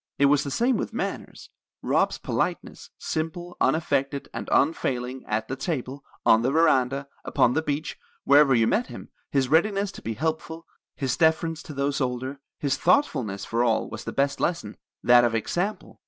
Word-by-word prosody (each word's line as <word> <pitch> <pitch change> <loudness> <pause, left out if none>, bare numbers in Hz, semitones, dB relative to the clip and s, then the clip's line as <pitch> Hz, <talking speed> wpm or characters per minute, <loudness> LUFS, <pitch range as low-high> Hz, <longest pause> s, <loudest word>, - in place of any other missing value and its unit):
"It 140 - +4
was 145 +1 +4
the 140 - -4
same 240 - +1
with - - -4
manners. - - -5 0.3
Rob's - - +1
politeness, - - -3
simple, 175 +2 -4
unaffected, 140 -3 0
and - - -5
unfailing, 130 -4 0
at 110 +1 -1
the 135 - -3
table, 135 -2 -4 0.2
on 110 - +6
the 125 - +1
veranda, 140 -3 +2 0.2
upon 120 - +2
the 160 - +1
beach, 150 0 -3 0.2
wherever 140 -1 +5
you 115 -1 +3
met 230 - +1
him; - - -10 0.2
his 135 -2 +1
readiness 195 +5 +2
to - - -11
be 115 0 -4
helpful; 160 +2 -3 0.3
his 130 -3 -1
deference 160 0 +2
to 150 - -9
those 140 +1 -1
older; 130 +2 -3 0.2
his 140 -3 -1
thoughtfulness 125 - +1
for 115 +1 0
all, 115 -2 0
was - - -6
the - - -4
best 140 0 0
lesson, 165 -12 -2 0.3
that 120 0 +6
of 120 -1 +1
example. 180 - -3
140 Hz, 170 wpm, -25 LUFS, 125-160 Hz, 0.3 s, on